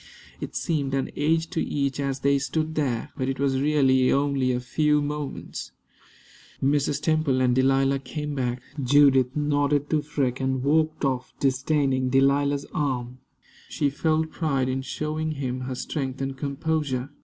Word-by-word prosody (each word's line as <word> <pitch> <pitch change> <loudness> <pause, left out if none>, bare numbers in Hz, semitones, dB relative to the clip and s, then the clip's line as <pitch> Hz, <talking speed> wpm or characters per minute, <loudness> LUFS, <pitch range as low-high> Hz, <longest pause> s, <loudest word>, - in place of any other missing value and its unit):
It - - -7
seemed 140 -5 -1
an 135 - -1
age 160 +2 +1
to 160 - -1
each 140 -1 -1
as 135 -1 -2
they 140 0 +3
stood 155 +3 -2
there, 135 -7 -1
but 130 0 -2
it 135 - -3
was 135 -1 +1
really 135 -3 +3
only 140 -2 +1
a 125 - 0
few 150 +4 +1
moments. 145 - -5 0.9
Mrs. 140 +1 +1
Temple 155 -4 +1
and 125 -1 +3
Delilah 135 +1 +3
came 150 +3 -5
back. 125 -2 -2 0.2
Judith 130 -1 +4
nodded 145 -1 +1
to 155 -1 +2
Freke, 140 -4 -1
and 130 -1 -1
walked 155 +1 +1
off, 130 -2 -2
disdaining 135 -1 +1
Delilah's 140 +2 +2
arm. 130 -4 -2 0.5
She 145 -2 0
felt 160 +2 0
pride 135 -6 0
in 130 +1 -1
showing 155 +3 -3
him 130 -3 -3
her 130 - -3
strength 135 0 -4
and 135 0 -3
composure. 140 -1 -2
140 Hz, 155 wpm, -25 LUFS, 130-150 Hz, 0.9 s, Judith